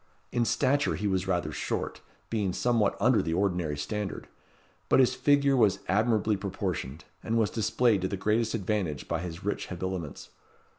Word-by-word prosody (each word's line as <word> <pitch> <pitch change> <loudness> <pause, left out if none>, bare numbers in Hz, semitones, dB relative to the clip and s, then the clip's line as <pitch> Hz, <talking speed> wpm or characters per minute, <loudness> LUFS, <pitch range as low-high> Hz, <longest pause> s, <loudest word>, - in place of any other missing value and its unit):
In 120 -1 +1
stature 140 +5 +2
he 105 - -4
was 95 -2 0
rather 85 -4 0
short, - - -3 0.3
being 105 -5 0
somewhat 115 -2 +1
under 120 +3 +4
the 80 - -2
ordinary 90 -6 0
standard; 100 +7 -4 0.6
but - - +5
his 130 -1 +5
figure 140 +1 +3
was 105 -6 +4
admirably 110 +1 +2
proportioned, 90 -7 -4 0.2
and 115 +1 0
was 110 -3 +2
displayed 110 -1 +2
to 95 - 0
the 100 - -3
greatest 110 +4 +1
advantage 95 - -2
by 85 - -1
his 85 0 -7
rich 105 - -2
habiliments. 90 -4 -5
100 Hz, 160 wpm, -28 LUFS, 90-115 Hz, 0.6 s, but